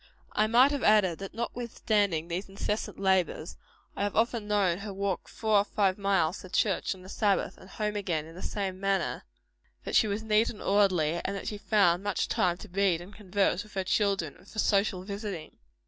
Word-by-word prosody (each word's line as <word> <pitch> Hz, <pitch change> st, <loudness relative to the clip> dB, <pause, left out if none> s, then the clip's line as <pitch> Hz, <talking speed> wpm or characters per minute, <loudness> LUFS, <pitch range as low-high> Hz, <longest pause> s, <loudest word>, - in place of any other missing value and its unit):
I 215 Hz, -, +2 dB
might 245 Hz, +5 st, +5 dB
have 285 Hz, -2 st, -1 dB
added, 205 Hz, -7 st, +4 dB
that 195 Hz, 0 st, -7 dB
notwithstanding 215 Hz, -7 st, -1 dB
these 180 Hz, +3 st, -4 dB
incessant 205 Hz, +2 st, -3 dB
labors, 190 Hz, -4 st, +1 dB, 0.4 s
I -, -, -4 dB
have 205 Hz, 0 st, -1 dB
often 225 Hz, -1 st, +1 dB
known 200 Hz, -4 st, +2 dB
her 205 Hz, 0 st, -6 dB
walk 195 Hz, -1 st, -2 dB
four 215 Hz, -2 st, +2 dB
or -, -, +3 dB
five 200 Hz, -2 st, 0 dB
miles 195 Hz, -3 st, +1 dB
to 185 Hz, -, -11 dB
church 195 Hz, 0 st, +1 dB
on 185 Hz, -, -14 dB
the -, -, -12 dB
Sabbath, 200 Hz, 0 st, 0 dB
and 185 Hz, -, -15 dB
home 210 Hz, 0 st, -3 dB
again 170 Hz, -7 st, -1 dB
in 165 Hz, -, -12 dB
the 180 Hz, -, -10 dB
same 190 Hz, -2 st, -3 dB
manner; 195 Hz, 0 st, -1 dB, 0.6 s
that -, -, -3 dB
she 220 Hz, -, +5 dB
was 205 Hz, +2 st, -2 dB
neat 220 Hz, +1 st, +3 dB
and 210 Hz, -, -8 dB
orderly; 180 Hz, -5 st, +2 dB
and 200 Hz, -, -2 dB
that 195 Hz, -, -6 dB
she 210 Hz, -, -6 dB
found 195 Hz, -5 st, +3 dB
much 205 Hz, -2 st, -1 dB
time 175 Hz, -1 st, +1 dB
to 215 Hz, -, -10 dB
read 190 Hz, -2 st, +2 dB
and 180 Hz, +4 st, -11 dB
converse 200 Hz, -2 st, 0 dB
with 210 Hz, 0 st, -14 dB
her 190 Hz, -, 0 dB
children, 195 Hz, -6 st, 0 dB
and 185 Hz, -, -20 dB
for -, -, -13 dB
social 200 Hz, -3 st, +2 dB
visiting. 200 Hz, -4 st, -6 dB
200 Hz, 205 wpm, -29 LUFS, 185-210 Hz, 0.6 s, might